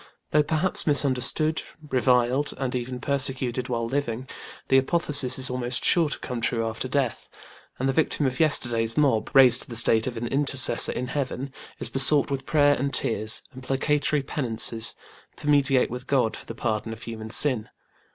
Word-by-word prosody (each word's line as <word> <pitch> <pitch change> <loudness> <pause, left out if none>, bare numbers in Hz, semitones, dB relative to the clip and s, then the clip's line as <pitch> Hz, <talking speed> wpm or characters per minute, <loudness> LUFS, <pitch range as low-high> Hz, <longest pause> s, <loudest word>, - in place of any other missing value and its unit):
Though 150 - +3
perhaps 160 +5 +1
misunderstood, 145 +2 +1 0.3
reviled 125 +2 +1
and 130 -2 -4
even 125 0 -5
persecuted 130 -2 -1
while 115 -1 -2
living, 130 -1 -4 0.4
the 135 - +5
apotheosis 140 -3 0
is 130 0 0
almost 125 0 -3
sure 165 -3 +3
to - - -2
come 125 -2 -6 0.2
after 115 +3 -4
death: 135 -2 -3 0.5
and 135 - -2
the 135 - 0
victim 150 0 0
of 130 +2 -3
yesterday's 120 -7 0
mob, 135 -7 +1
raised 130 -2 +7
to - - -11
the 120 - -6
state 115 0 +5
of 120 -2 -5
an 115 - -4
Intercessor 135 0 +4
in 125 +1 -5
Heaven, 135 0 -5 0.2
is - - -4
besought 140 +2 +4
with 135 -1 -5
prayer 145 -2 +3
and 140 0 -3
tears, 110 -3 0
and 130 - -11
placatory 145 +2 -1
penances, 115 -4 0 0.4
to - - -4
mediate 140 -4 +2
with 125 +2 -8
God 130 -5 0
for - - -10
the 115 - -8
pardon 110 -1 -3
of 115 - -11
human 110 -1 -8
sin. 125 -2 -1
130 Hz, 170 wpm, -24 LUFS, 120-140 Hz, 0.5 s, raised